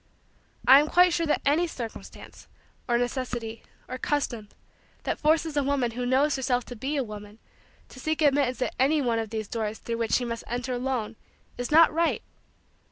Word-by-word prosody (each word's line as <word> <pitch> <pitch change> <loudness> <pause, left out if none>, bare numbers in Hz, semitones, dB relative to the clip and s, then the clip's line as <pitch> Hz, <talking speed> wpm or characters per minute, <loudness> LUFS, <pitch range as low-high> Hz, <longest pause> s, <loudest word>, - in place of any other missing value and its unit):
I 270 +2 +10
am 300 - +1
quite 360 0 +5
sure 335 -1 0
that 300 - 0
any 310 +5 +3
circumstance, 235 -8 -9 0.4
or 240 -1 +2
necessity, 240 -2 -3 0.3
or 255 0 -6
custom, 240 -8 -2 0.5
that - - -2
forces 315 0 +2
a 290 - +3
woman 270 -3 0
who 245 +2 -3
knows 275 +4 +3
herself 250 -2 0
to 245 - -8
be 275 +6 -3
a 275 - +1
woman 210 -1 -9 0.5
to - - -12
seek 315 +3 -1
admittance 275 -3 +2
at - - -3
any 290 +4 +3
one 235 -4 +1
of 225 -1 -3
those 220 -1 -4
doors 220 -1 -3
through 230 -1 -4
which 230 -1 -1
she 250 - +2
must 230 -1 -4
enter 245 +2 -3
alone 245 -3 -2 0.4
is 245 - -4
not 320 +1 +6
right. 335 +1 +1
255 Hz, 185 wpm, -27 LUFS, 230-290 Hz, 0.5 s, I